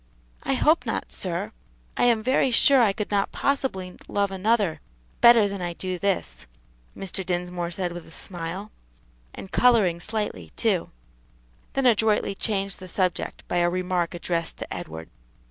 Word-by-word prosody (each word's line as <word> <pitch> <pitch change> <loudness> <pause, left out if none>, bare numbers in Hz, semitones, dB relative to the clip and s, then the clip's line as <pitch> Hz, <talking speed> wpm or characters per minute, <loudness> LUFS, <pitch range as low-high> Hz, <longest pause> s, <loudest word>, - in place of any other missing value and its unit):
"I - - 0
hope - - +3
not, - - -3
sir; 65 - -2 0.4
I - - +2
am 230 -3 +3
very 260 +2 +3
sure 260 +2 +6
I 220 -4 +4
could 210 +1 -4
not 200 -1 +1
possibly 225 -10 -1
love 200 -1 0
another 195 -4 +1 0.4
better 235 -3 +8
than 200 -1 -5
I 175 -1 -2
do 185 +1 -4
this," 185 - -2 0.5
Mr. 195 0 -3
Dinsmore 175 -1 -2
said 180 0 -2
with 175 -1 -8
a - - -15
smile, 180 +4 -6 0.6
and 190 - -9
coloring 215 -9 +4
slightly, 215 +3 -4
too; 205 -7 +1 0.8
then 270 -1 0
adroitly 220 -3 +3
changed 195 -1 -2
the 185 - -9
subject 185 -1 -2
by 175 - -1
a 175 0 +3
remark 180 -1 -1
addressed 170 -1 -2
to - - -6
Edward. 80 +1 -7
190 Hz, 155 wpm, -25 LUFS, 175-215 Hz, 0.8 s, better